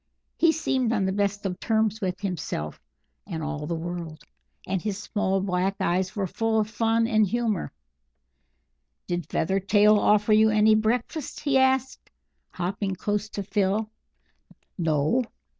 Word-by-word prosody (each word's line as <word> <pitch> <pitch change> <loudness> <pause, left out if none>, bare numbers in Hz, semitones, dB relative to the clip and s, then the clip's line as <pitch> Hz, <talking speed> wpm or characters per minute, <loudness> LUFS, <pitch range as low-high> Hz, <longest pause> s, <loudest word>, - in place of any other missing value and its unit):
He 330 - +4
seemed 265 -7 0
on 205 -4 +1
the 190 - 0
best 200 0 -1
of 180 -2 -3
terms 220 -1 0
with 185 -1 -2
himself 170 - -4 0.5
and 165 -5 -4
all 150 -1 -4
the 170 - -2
world, 165 -2 -6 0.4
and 190 -1 -2
his 205 0 -3
small 200 -2 -1
black 190 0 0
eyes 185 +2 0
were 200 -2 -1
full 225 +4 0
of 210 - 0
fun 225 +1 +2
and 215 -3 +3
humour. 225 -2 -1 1.3
"Did 175 -3 -3
Feathertail 205 +4 +3
offer 210 +1 +3
you 220 +1 +5
any 215 0 +4
breakfast?" 235 +7 -1
he 285 -2 0
asked, 265 0 +1 0.4
hopping 190 +2 -3
close 205 +3 -2
to 205 - -5
Phil. 210 +2 0 0.8
"No." 160 - +1
205 Hz, 140 wpm, -26 LUFS, 180-220 Hz, 1.3 s, you